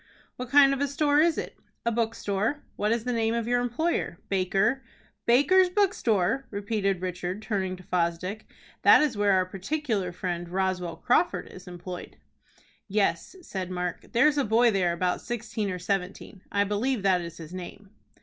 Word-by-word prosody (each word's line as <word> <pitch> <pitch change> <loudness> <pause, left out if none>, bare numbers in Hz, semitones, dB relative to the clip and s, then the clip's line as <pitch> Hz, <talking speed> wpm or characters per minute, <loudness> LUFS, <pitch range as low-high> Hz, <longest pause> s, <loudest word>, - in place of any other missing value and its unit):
"What 250 -1 -6
kind 275 0 +6
of 275 - -3
a 285 - +2
store 290 +1 +2
is 330 +1 +3
it?" - - -5 0.3
"A 235 - +2
bookstore." 225 +2 -1
"What 210 +1 0
is 230 -1 0
the 250 0 -1
name 225 0 +1
of 235 -1 -2
your 245 0 +2
employer?" 245 - -1
"Baker." 195 +6 +1 0.5
"Baker's 305 +10 +5
bookstore!" 270 - +1
repeated 200 -2 -1
Richard, 180 +2 -4
turning 190 -4 -2
to 185 - -14
Fosdick. 180 +4 -2 0.3
"That - - +7
is 285 -6 0
where 205 -1 +3
our 185 -1 +3
particular 195 - -2
friend, 175 -1 -4
Roswell 180 -2 -1
Crawford, 250 - +1
is 185 - -13
employed." 180 0 -8 0.7
"Yes," 200 - 0
said 190 - -5
Mark; 180 -1 -4
"there's 290 +5 +4
a - - +3
boy 230 +1 +4
there 185 -4 +1
about 180 +1 -1
sixteen 225 -3 -3
or 180 - -3
seventeen. 190 +1 -4
I 200 0 +2
believe 210 +3 -1
that 185 -2 +3
is 170 -1 -8
his 165 +1 -10
name." 190 +2 -9
205 Hz, 170 wpm, -27 LUFS, 185-245 Hz, 0.7 s, That